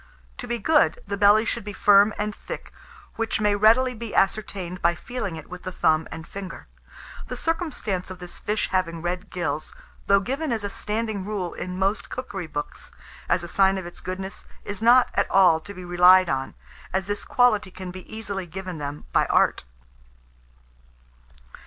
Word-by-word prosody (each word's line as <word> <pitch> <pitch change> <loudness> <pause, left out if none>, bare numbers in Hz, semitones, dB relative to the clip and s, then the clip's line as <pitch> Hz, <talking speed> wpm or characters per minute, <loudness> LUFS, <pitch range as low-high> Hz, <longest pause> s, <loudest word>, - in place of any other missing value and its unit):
To 245 - -6
be 240 0 -1
good, 305 +5 +3
the 200 - -3
belly 205 +2 +5
should 235 -1 -2
be 205 0 -6
firm 205 +1 +6
and 210 0 -2
thick, - - -8 0.4
which 230 -1 -1
may 210 -1 +2
readily 230 +5 +4
be 230 -1 -7
ascertained 195 -3 0
by 170 0 +3
feeling 205 -7 -5
it 160 - -9
with 180 0 -9
the 185 - -5
thumb 160 -2 +2
and 160 0 -7
finger. 195 +1 -8 0.6
The - - -5
circumstance 305 - -2
of 185 - -7
this 180 -1 -9
fish 210 +1 -1
having 170 -3 -1
red 180 +1 -3
gills, 155 -4 -3 0.3
though 200 0 +5
given 270 +8 -2
as 225 -3 -1
a 200 - -3
standing 215 -1 -2
rule 195 -4 -3
in 180 0 -5
most 195 +3 0
cookery 200 -9 -5
books, 150 -1 -6 0.4
as 175 - +2
a - - -5
sign 195 +2 +3
of 190 - -5
its 175 - -10
goodness, 190 +1 -6 0.2
is 200 0 -5
not 240 +2 +6
at - - +1
all 185 -4 +5
to 200 - -11
be 185 -2 -9
relied 180 +1 +6
on, 135 0 -2 0.4
as 190 0 0
this 205 0 -3
quality 215 -6 +3
can 185 0 -8
be 185 0 -11
easily 200 -4 -5
given 185 -1 -6
them 145 +1 -6
by - - +3
art. - - +2
195 Hz, 180 wpm, -24 LUFS, 180-215 Hz, 0.6 s, firm